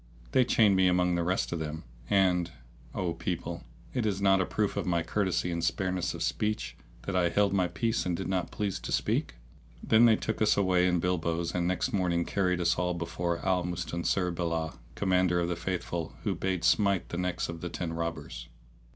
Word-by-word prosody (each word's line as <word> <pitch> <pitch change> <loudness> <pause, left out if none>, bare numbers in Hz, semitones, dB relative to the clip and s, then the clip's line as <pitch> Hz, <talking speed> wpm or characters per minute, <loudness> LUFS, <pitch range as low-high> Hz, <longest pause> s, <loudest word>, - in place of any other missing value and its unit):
They 130 - +5
chained 105 -4 +4
me 95 -1 +4
among 90 0 +2
the 85 - +1
rest 90 +3 0
of 85 - -2
them; 80 0 -5 0.3
and, 90 -3 +3 0.5
O 90 -2 -1
people, 85 0 -4 0.3
is 105 -5 0
it - - -4
not 95 -1 +5
a - - -1
proof 105 -2 -1
of - - -2
my 85 -2 +1
courtesy 95 -1 0
and 85 -1 -2
spareness 90 +1 -1
of - - -3
speech, 105 - -1 0.3
that 100 - -3
I 90 -2 +3
held 100 +2 +2
my 95 -2 +2
peace 110 +7 -1
and 90 -2 -1
did - - -4
not 95 -2 -1
please 100 -3 -2
to - - -6
speak? - - 0 0.5
Then 110 +2 +5
they 115 -2 +6
took 110 0 -3
us 110 - +4
away 90 -2 +3
in 90 -1 +2
bilbos 85 -1 -1
and 90 -1 0
next 90 -1 -1
morning 85 -3 +1
carried 90 -3 0
us 85 -1 +2
all 90 0 0
before 85 +1 -3
Al 90 -2 +2
Mustansir 90 +1 -1
bi'llah, 85 -2 -2 0.2
Commander 90 -2 +2
of 85 0 0
the 85 - -1
Faithful, 85 -1 -4
who - - 0
bade 95 -2 -2
smite 100 0 +2
the 85 - -4
necks 90 -1 -1
of 85 -1 -7
the 90 - -4
ten 85 -1 -4
robbers. 80 -8 -5
90 Hz, 205 wpm, -29 LUFS, 85-95 Hz, 0.5 s, they